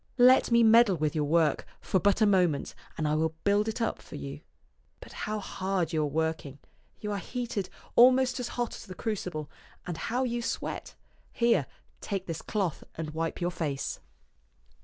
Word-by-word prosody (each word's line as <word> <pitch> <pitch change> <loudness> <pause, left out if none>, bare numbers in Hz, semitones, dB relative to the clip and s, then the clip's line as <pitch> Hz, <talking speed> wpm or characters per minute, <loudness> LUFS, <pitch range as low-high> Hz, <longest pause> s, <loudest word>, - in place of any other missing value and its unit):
Let 255 +1 +6
me 235 -1 +5
meddle 225 -4 +6
with 150 -1 0
your 150 -2 0
work 160 0 +2 0.2
for 190 - 0
but 200 +4 +2
a - - +7
moment 180 -8 +2 0.2
and 155 - 0
I 150 - +1
will 160 +1 0
build 205 +1 +3
it 220 - -3
up 230 - -1
for - - -11
you. 70 0 -7 0.6
But - - -12
how 215 0 -3
hard 190 -4 -2
you 155 - +2
are 150 - +1
working! 160 -2 -2 0.4
You 210 - -4
are 200 - -1
heated 225 -4 -4 0.3
almost 255 +1 +5
as 245 - -2
hot 240 -2 -1
as - - -9
the 185 - -8
crucible, 180 -9 -3 0.4
and 175 -2 -4
how 245 +8 -1
you 240 -1 -1
sweat! - - -4 0.4
Here, 235 0 +2 0.3
take 195 -3 -3
this 165 -2 -4
cloth 195 -7 -2
and 155 -1 -4
wipe 165 +1 -3
your 175 +1 0
face." 145 -6 -3
190 Hz, 180 wpm, -29 LUFS, 160-230 Hz, 0.6 s, a